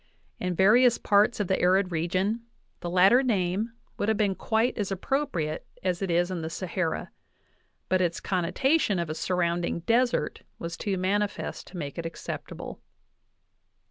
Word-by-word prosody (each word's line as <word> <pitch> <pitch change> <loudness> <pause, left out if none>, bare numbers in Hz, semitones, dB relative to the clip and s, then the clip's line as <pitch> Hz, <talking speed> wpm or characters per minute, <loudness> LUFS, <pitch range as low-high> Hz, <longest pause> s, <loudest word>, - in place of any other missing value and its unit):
In 180 -1 -2
various 235 +6 +5
parts 210 +3 +3
of 205 - 0
the 190 - +1
arid 185 +1 +3
region 185 +7 0 0.4
the 175 - -4
latter 190 +8 +6
name 210 -2 0 0.3
would 205 - +1
have 220 - +2
been 205 -3 +2
quite 225 +5 0
as 205 -3 -2
appropriate 195 - -2 0.2
as 180 -1 0
it 195 - -1
is 175 +2 +2
in 175 -3 -3
the 160 - -4
Sahara, 170 -1 -3 0.8
but 185 0 +2
its 170 -2 0
connotation 200 - +1
of 170 -2 -2
a - - -1
surrounding 170 0 -1
desert 235 -4 +1 0.2
was 170 0 -5
too 195 +2 -2
manifest 205 +3 -1
to 185 - -9
make 145 0 -5
it 165 - -3
acceptable. 165 - -7
185 Hz, 155 wpm, -27 LUFS, 175-210 Hz, 0.8 s, latter